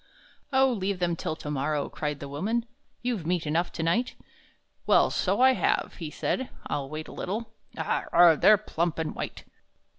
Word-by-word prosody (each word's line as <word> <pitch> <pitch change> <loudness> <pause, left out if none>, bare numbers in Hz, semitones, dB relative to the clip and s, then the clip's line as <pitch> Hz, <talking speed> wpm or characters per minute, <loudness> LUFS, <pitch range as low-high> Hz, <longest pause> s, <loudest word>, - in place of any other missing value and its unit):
"O, 265 -1 +4
leave 200 -2 -1
them 175 -1 0
till 160 - -3
to 150 - -6
morrow!" 145 +1 -1
cried 150 -2 -4
the 140 - -6
woman; 210 +12 -1 0.4
"You've 240 -8 -1
meat 175 -2 0
enough 165 +4 0
to 165 - -3
night." 225 +10 +1 0.7
"Well, - - +5
so - - +1
I 260 0 +7
have," - - 0
he 160 -3 -4
said, 260 +10 -2 0.2
"I'll 140 -2 -3
wait 155 +1 -6
a - - -10
little. 220 +4 -4 0.2
Ah! - - -1
ugh! 170 -2 +6
they're 215 - +7
plump 170 -5 -2
and 160 -1 -2
white." - - -6
175 Hz, 180 wpm, -27 LUFS, 155-220 Hz, 0.7 s, I